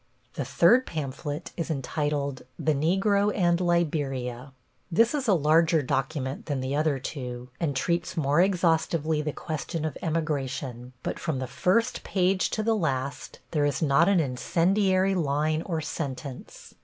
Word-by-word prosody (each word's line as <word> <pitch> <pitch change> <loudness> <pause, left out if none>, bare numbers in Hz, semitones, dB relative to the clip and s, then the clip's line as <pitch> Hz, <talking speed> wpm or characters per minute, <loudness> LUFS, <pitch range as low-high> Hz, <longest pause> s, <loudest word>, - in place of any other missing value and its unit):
The - - -3
third 255 +2 +4
pamphlet 150 +1 -4
is 165 - -3
entitled 145 -1 -2 0.2
The 155 - +1
Negro 195 +7 +2
and 175 -2 +2
Liberia. 140 -7 -1 0.4
This 230 - +4
is 280 -4 -1
a 200 - +5
larger 160 0 +3
document 135 +1 -2
than 145 -3 -1
the 130 +2 -2
other 150 -1 +1
two, 125 -2 -6
and 150 -5 -1
treats 170 +5 -1
more 150 +1 +3
exhaustively 165 -4 +1
the 150 0 -2
question 155 +1 -4
of 155 - -4
emigration, 135 -6 -3
but - - -3
from 160 -5 -2
the 130 - -2
first 185 - +1
page 185 0 +1
to 215 - -2
the 225 +1 +2
last 140 -8 -3
there 150 -3 +1
is 145 0 0
not 155 +5 +4
an 195 -3 +4
incendiary 185 +7 +2
line 155 -2 0
or 165 -2 -3
sentence. 140 -3 -6
155 Hz, 150 wpm, -27 LUFS, 140-175 Hz, 0.4 s, a